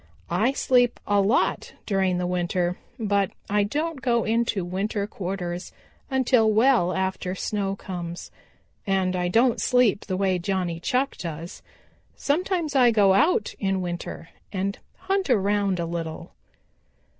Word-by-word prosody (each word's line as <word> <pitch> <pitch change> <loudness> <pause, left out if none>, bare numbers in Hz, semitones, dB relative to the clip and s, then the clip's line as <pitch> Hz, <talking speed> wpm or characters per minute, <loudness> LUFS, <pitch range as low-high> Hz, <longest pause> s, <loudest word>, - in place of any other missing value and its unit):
"I 215 +10 +2
sleep 245 -3 +2
a 205 -1 +3
lot 205 +5 +1
during 190 -3 +1
the 180 - -1
winter, 180 0 0 0.2
but 200 -4 +1 0.2
I 205 0 +3
don't 295 +7 -2
go 235 -2 +2
into 225 -4 0
winter 200 +3 -2
quarters 180 -3 -5 0.4
until 255 -4 +3
well 220 -5 +4
after 190 0 -2
snow 195 0 -2
comes, 175 -3 -7 0.6
and 190 -1 +1
I 180 -1 0
don't 230 +6 +3
sleep 245 -6 +3
the 185 - -1
way 190 -2 +1
Johnny 175 -2 -2
Chuck 255 +9 0
does. 165 0 -7 0.5
Sometimes 330 0 -1
I 250 -3 +6
go 205 -4 +4
out 210 - +2
in 195 -1 0
winter 175 -1 -6 0.2
and 195 +1 -2 0.2
hunt 385 -3 -1
around 200 -4 +2
a 170 - -1
little." 165 0 -5
195 Hz, 135 wpm, -25 LUFS, 180-235 Hz, 0.6 s, I